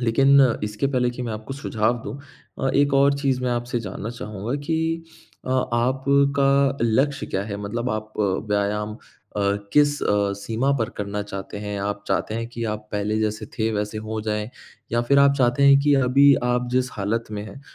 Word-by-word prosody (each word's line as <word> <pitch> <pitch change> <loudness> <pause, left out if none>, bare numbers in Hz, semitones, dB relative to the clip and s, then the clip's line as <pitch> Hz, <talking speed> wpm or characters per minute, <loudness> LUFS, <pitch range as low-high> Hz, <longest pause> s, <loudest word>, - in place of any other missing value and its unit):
लेकिन 135 +4 +5 0.2
इसके 105 +5 -1
पहले 125 -3 +1
कि 125 +1 -6
मैं 115 - -3
आपको 110 +5 -6
सुझाव 120 -3 0
दूँ 140 - -6 0.4
अ, 135 - +1
एक 140 0 +3
और 140 +1 +5
चीज़ 135 -3 0
मैं 125 - 0
आपसे 120 0 -2
जानना 110 0 -6
चाहूँगा 110 +1 -5
कि 165 0 0 0.4
अ, - - -3 0.2
आपका 140 +2 +2
लक्ष्य 135 +5 +1
क्या 95 - -2
है? 100 -1 -5
मतलब 115 +5 -3
आप 110 0 -4
व्यायाम 105 +1 0 0.4
अ, - - 0 0.3
किस 145 0 +3
अ, 100 -1 +1
सीमा 115 +7 -1
पर 115 - 0
करना 105 0 -3
चाहते 100 0 -7
हैं? 105 -1 -4
आप 100 0 -3
चाहते 110 - -1
हैं 115 0 -3
कि 115 -1 -5
आप 105 0 -8
पहले 105 +1 -1
जैसे 110 0 -2
थे 110 0 +1
वैसे 105 +1 -2
हो 110 0 -4
जाएँ 105 0 -2 0.4
या 120 - +2
फ़िर 140 +3 +3
आप 140 0 +6
चाहते 125 +2 +2
हैं 140 0 +7
कि 145 0 +3
अभी 135 +2 +5
आप 125 0 0
जिस 125 0 +2
हालत 105 +3 -2
में 105 -1 -4
हैं, 110 +6 -10
115 Hz, 190 wpm, -23 LUFS, 105-135 Hz, 0.4 s, हैं